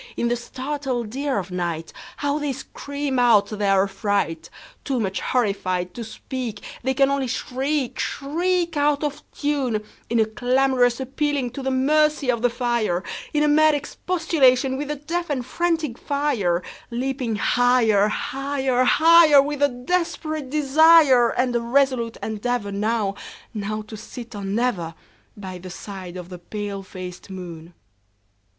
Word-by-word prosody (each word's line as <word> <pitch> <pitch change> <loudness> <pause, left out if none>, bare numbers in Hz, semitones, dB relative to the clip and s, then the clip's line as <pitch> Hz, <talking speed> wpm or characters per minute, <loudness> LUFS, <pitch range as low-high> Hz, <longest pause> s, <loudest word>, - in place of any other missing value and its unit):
In 235 - +1
the 240 - +2
startled 255 -2 -4
ear 280 -2 -1
of 190 -2 -3
nightHow 180 - -3
they 290 -2 -1
scream 280 +1 -4
out 235 -4 +5
their 200 -2 +2
affright! 195 -5 -1 0.3
Too 265 -3 -1
much 195 -3 -1
horrified 185 -6 -1
to 235 - -6
speak, 230 -1 -6 0.2
They 265 0 -1
can 275 0 +4
only 275 -2 0
shriek, 265 +2 -2
shriek, 340 +4 -1
Out 290 0 +2
of 295 0 -3
tune, 270 -7 -1 0.3
In 235 - +2
a 220 - +4
clamorous 245 +2 +2
appealing 270 -1 -1
to 275 - -6
the 265 - -1
mercy 290 +1 +2
of 235 -2 -2
the 245 - +3
fire, 235 -7 0 0.3
In 300 0 +2
a - - +3
mad 310 +1 +5
expostulation 285 -4 +1
with 285 +2 -3
the 300 - -2
deaf 335 +4 -3
and 260 -4 -2
frantic 320 -4 -1
fire, 230 -12 0 0.3
Leaping 250 -1 -2
higher, 225 -2 +3
higher, 265 +1 -1
higher, 320 +2 +7
With 290 +1 0
a 285 - +6
desperate 310 +1 -2
desire, 295 -3 +6
And 250 0 0
a 235 - +2
resolute 245 -1 +1
endeavorNow—now 215 -1 -3
to 215 +1 -10
sit 235 +2 -9
or 205 -1 -6
never, 195 -5 -1 0.4
By 190 -3 -7
the 185 +1 -9
side 185 -1 -8
of 180 -1 -8
the 180 -1 -8
pale 205 +2 -5
faced 185 -1 -9
moon. 175 -3 -9
250 Hz, 145 wpm, -23 LUFS, 210-285 Hz, 0.4 s, higher